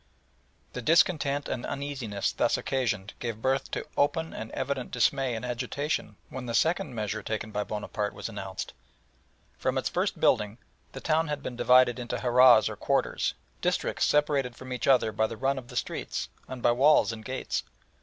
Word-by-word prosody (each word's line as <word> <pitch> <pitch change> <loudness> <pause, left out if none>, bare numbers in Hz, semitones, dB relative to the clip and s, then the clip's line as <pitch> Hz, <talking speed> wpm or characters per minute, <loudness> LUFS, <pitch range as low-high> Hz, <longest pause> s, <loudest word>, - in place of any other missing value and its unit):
The 125 - -4
discontent 150 -1 +3
and 120 - -3
uneasiness 130 -8 -3
thus - - +1
occasioned 110 -7 -1
gave 115 -3 -4
birth 135 +3 0
to - - -3
open 160 +3 +1
and 110 - -6
evident 130 -1 -2
dismay 130 0 +1
and 110 - -4
agitation 125 -1 -2
when 130 -1 -6
the 115 - -2
second 160 -5 +1
measure 105 -2 -2
taken 110 0 -4
by 105 0 -1
Bonaparte 105 0 -3
was - - -5
announced. - - -6 0.9
From - - 0
its - - 0
first - - -1
building, 105 +1 +2 0.4
the 135 - -7
town 160 +1 +2
had 145 -1 -3
been 125 - -5
divided 125 0 +5
into 120 - -3
harahs 125 -2 +6
or - - -4
quarters - - 0 0.3
districts - - +1
separated 145 -4 +2
from 130 0 -7
each 125 - -3
other 125 -5 +4
by 110 0 +1
the 115 - -7
run 135 +2 0
of 125 - -13
the - - -11
streets, - - -3 0.2
and 130 -2 -7
by 120 - +5
walls 135 +2 +5
and 110 -1 -7
gates. 130 +3 -2
125 Hz, 175 wpm, -28 LUFS, 115-140 Hz, 0.9 s, harahs